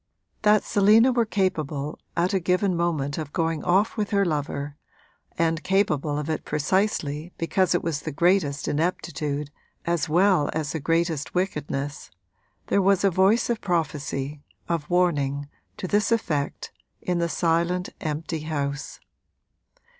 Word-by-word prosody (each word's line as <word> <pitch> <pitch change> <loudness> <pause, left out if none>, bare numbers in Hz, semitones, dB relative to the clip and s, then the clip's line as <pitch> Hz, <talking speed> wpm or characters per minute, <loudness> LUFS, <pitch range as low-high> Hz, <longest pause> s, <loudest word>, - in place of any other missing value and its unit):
That 210 -1 +4
Selina 215 +5 +5
was 235 -3 +1
capable 155 -7 -1 0.2
at 175 +3 +2
a 190 - +3
given 180 +2 +1
moment 160 -4 -1
of 150 -2 -5
going 165 -1 -1
off 195 +7 +2
with 210 -2 -1
her 200 -1 +2
lover, 145 -2 -2 0.6
and 165 -1 +1
capable 155 -7 +1
of 150 0 -3
it 160 -1 -2
precisely 155 -1 -1
because 180 +2 +1
it - - 0
was 160 -3 -1
the 155 - -5
greatest 165 -2 +1
ineptitude 150 -2 -2 0.3
as 170 -2 0
well 180 -2 +4
as 155 -2 -2
the 160 - -3
greatest 165 0 0
wickedness 145 -6 -2 0.6
there 200 - +2
was 195 0 +3
a 195 - +4
voice 190 +6 +3
of 235 -2 -1
prophecy, 150 -5 -2 0.3
of 165 -3 -2
warning, 145 -6 +1 0.3
to 185 - -4
this 210 +4 +1
effect 155 -11 -1 0.3
in 180 -1 0
the 170 0 0
silent, 170 +2 +1
empty 155 +1 -3
house. 145 -2 -3
165 Hz, 140 wpm, -25 LUFS, 150-185 Hz, 0.6 s, Selina